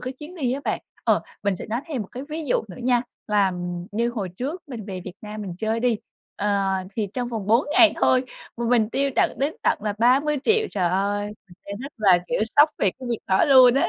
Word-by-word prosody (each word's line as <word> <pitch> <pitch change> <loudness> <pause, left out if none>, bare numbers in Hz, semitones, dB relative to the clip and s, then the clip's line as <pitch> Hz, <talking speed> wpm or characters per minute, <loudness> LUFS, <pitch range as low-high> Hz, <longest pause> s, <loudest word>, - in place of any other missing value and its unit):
cái 255 +1 -4
chuyến 300 +7 -11
đi 260 -8 -1
á 270 - -2
bạn. - - -1 0.2
Ờ, - - +3 0.2
mình 200 -3 +1
sẽ - - -7
nói 230 +3 -2
thêm 280 -8 -3
một 195 - -11
cái 255 - -6
ví 315 +1 -4
dụ 250 - +1
nữa 180 - -10
nha, 245 -1 +3 0.2
là 205 -3 +2 0.4
như 235 +3 +1
hồi 210 -6 -3
trước 275 - -5
mình 230 -6 -6
về 190 -3 -5
Việt 180 - -7
Nam 210 0 -6
mình 185 -3 -6
chơi 220 +2 -1
đi, 240 -2 +2 0.4
ờ, 205 0 +1 0.4
thì 215 -3 -1
trong 245 -2 -2
vòng 220 -5 -4
4 230 +6 +3
ngày 330 +1 +7
thôi 255 0 +3 0.3
mà 235 - -3
mình 230 -3 +3
tiêu 275 +2 +1
tận - - +3
đến 285 +4 0
tận - - +2
là 210 -1 -1
30.000.000. 295 - +3
Trời 185 -4 +1
ơi! 200 +3 0 0.2
Mình 175 - -15
thấy 200 - -5
rất 275 +3 -7
là, 195 -5 +5
kiểu, 245 - 0 0.2
sốc 295 +2 +8
về 195 - +3
cái 255 - -8
việc 235 - 0
đó 190 0 +4
luôn 255 -3 +7
á. 275 - +2
235 Hz, 240 wpm, -24 LUFS, 205-265 Hz, 0.4 s, sốc